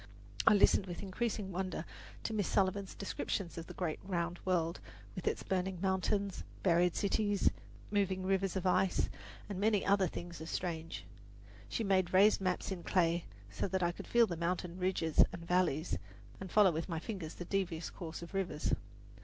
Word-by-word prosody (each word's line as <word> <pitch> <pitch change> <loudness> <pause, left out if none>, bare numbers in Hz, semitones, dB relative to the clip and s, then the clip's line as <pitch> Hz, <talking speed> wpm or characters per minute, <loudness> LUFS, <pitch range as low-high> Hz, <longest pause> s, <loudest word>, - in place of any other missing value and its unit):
I - - +9
listened 200 -1 +5
with 175 +2 -5
increasing 205 0 -2
wonder 185 -2 -3 0.4
to 225 - -2
Miss 205 -4 0
Sullivan's 195 0 +1
descriptions 195 -2 -3
of 165 -1 -6
the - - -9
great 170 -4 -2
round 175 -2 -2
world 170 -2 +1 0.3
with 185 - -5
its - - 0
burning 185 -1 -1
mountains, 190 +1 0 0.2
buried 175 -1 +4
cities, 205 -1 +2 0.4
moving 190 -2 +1
rivers 195 0 +1
of 190 -1 -2
ice, 185 0 +2 0.4
and 200 -3 -4
many 210 -1 +2
other 200 -1 +4
things 170 0 -7
as 160 - -6
strange. 165 - -3 0.6
She 170 - -1
made 185 -3 +2
raised 200 +2 +6
maps 185 +1 -1
in 185 -2 -3
clay, 170 -1 +2 0.3
so - - -1
that 190 -1 0
I 175 - +3
could - - -9
feel 235 -1 +5
the 175 - -3
mountain 175 +1 -2
ridges 180 -4 +3
and 170 -1 -8
valleys, 175 - +1 0.4
and 190 -2 -7
follow 205 -3 +6
with 165 +3 -3
my 165 - -1
fingers 175 -2 -5
the 175 - -6
devious 175 -4 -1
course 170 -1 -7
of 170 - -10
rivers. 180 -6 -1
185 Hz, 175 wpm, -34 LUFS, 170-195 Hz, 0.6 s, I